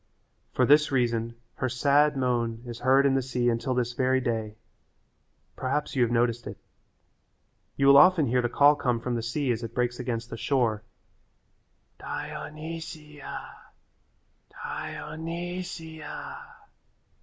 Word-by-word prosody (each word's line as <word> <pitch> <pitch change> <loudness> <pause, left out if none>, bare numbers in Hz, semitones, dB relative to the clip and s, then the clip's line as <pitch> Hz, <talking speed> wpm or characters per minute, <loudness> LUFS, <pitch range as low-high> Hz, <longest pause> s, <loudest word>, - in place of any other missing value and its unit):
For 125 - +3
this 150 +3 +5
reason 115 -3 0 0.2
her 130 - -1
sad 140 +3 +3
moan 120 -3 -1
is 120 -1 -7
heard 135 +2 +4
in 140 - +4
the 135 - +2
sea 125 -1 0
until 120 +2 -1
this 120 -1 0
very 130 +1 +2
day. 110 -4 -2 1.0
Perhaps 140 +3 -2
you 130 - +2
have 120 -1 +3
noticed 120 0 +1
it. - - -7 1.2
You 140 - +2
will 140 0 +8
often 180 -3 +6
hear 125 0 +2
the 120 - -1
call 145 +4 +6
come 125 -5 0
from 125 +1 -3
the 115 - -1
sea 125 +3 -1
as 115 -1 -2
it 115 -1 -7
breaks 120 0 0
against 120 -2 -4
the 115 - -5
shore, 115 -5 +1 1.2
"Dionysia, 155 -2 -7 1.0
Di - - -6
o - - -7
ny 170 +3 -4
si 160 -3 -8
a." - - -8
130 Hz, 145 wpm, -27 LUFS, 120-145 Hz, 1.2 s, will